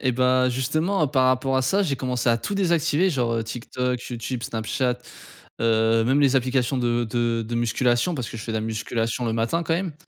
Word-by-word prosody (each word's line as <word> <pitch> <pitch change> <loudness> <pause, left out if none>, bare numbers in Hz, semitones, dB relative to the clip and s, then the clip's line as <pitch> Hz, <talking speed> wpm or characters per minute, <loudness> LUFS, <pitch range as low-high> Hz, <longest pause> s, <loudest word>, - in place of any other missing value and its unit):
Et 130 -2 +1
bah, 130 +1 +3
justement, 155 - 0
par 130 -2 +2
rapport 130 +1 +1
à 130 - +2
ça, 195 +10 +2
j'ai 140 -7 -1
commencé 125 -2 -1
à 115 - +4
tout 200 - -4
désactiver 175 -2 +2
genre, 120 -5 0
heu, 115 - 0
TikTok, 125 +2 -3
YouTube, 120 +1 -4
Snapchat, 125 +3 -1 0.6
heu, 115 0 +3
même 135 +4 +2
les 135 -1 +4
applications 130 0 +1
de 120 -1 +1
de 115 0 -1
de 120 - -4
musculation- 120 +6 +1
parce 125 -6 -4
que - - -8
je 110 - -7
fais 115 - -4
de 110 - 0
la - - -3
musculation 115 +2 -2
le 115 - -1
matin, 115 +10 0
quand 165 - -1
même- 175 -3 -3
125 Hz, 215 wpm, -24 LUFS, 115-135 Hz, 0.6 s, à